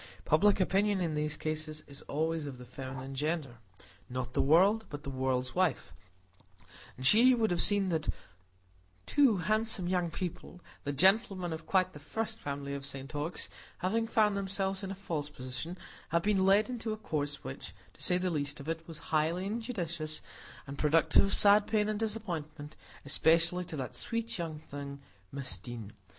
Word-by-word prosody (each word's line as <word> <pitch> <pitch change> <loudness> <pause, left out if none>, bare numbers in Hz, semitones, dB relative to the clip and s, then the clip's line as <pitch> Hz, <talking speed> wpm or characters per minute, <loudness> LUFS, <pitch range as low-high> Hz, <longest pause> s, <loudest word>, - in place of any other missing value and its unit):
Public 200 +7 +4
opinion, 195 +2 +2
in 170 -3 0
these 150 0 -1
cases, 155 0 -3
is 140 0 -8
always 160 +1 -1
of 135 -3 -7
the 125 - -10
feminine 130 +1 -7
gender,—not 130 - -5
the - - +2
world, 190 +10 +5
but 145 0 -7
the 140 - -4
world's 130 -1 -1
wife; 180 -7 0 1.0
and 130 - -5
she 240 - +7
would 225 -4 +1
have 175 -1 +1
seen 200 -2 +3
that 160 -3 -1 1.0
two 275 -8 +4
handsome 215 0 0
young 180 -1 +1
people—the 175 -3 -6
gentleman 190 - +3
of 160 - -7
quite 185 -1 +2
the 145 - -9
first 220 +9 -4
family 140 0 -4
in 140 - -4
St 135 0 -6
Ogg's—having 185 +7 -3
found 215 -3 +3
themselves 195 0 -1
in 195 - -4
a 195 - -4
false 165 -6 -3
position, 130 +5 -6 0.3
had 170 0 +1
been 195 -2 +3
led 200 +3 +5
into 230 -3 -3
a - - -5
course 145 -8 -3
which, 65 - -6 0.2
to - - -16
say 180 - +4
the 180 0 0
least 145 -2 -2
of 140 - -9
it, 165 0 -3
was 165 -2 -8 0.2
highly 160 +4 +2
injudicious, 175 -9 -3 0.5
and 140 0 -8
productive 160 +3 +4
of 195 - 0
sad 205 0 +7
pain 210 -2 +2
and 215 -1 -1
disappointment, 170 -9 -4 0.3
especially 165 +4 +3
to 160 - -6
that 130 -4 -4
sweet 230 -3 -3
young 165 -2 -3
thing, 140 -1 -7 0.3
Miss 135 -1 -4
Deane. 115 -4 -8
165 Hz, 165 wpm, -32 LUFS, 145-195 Hz, 1.0 s, she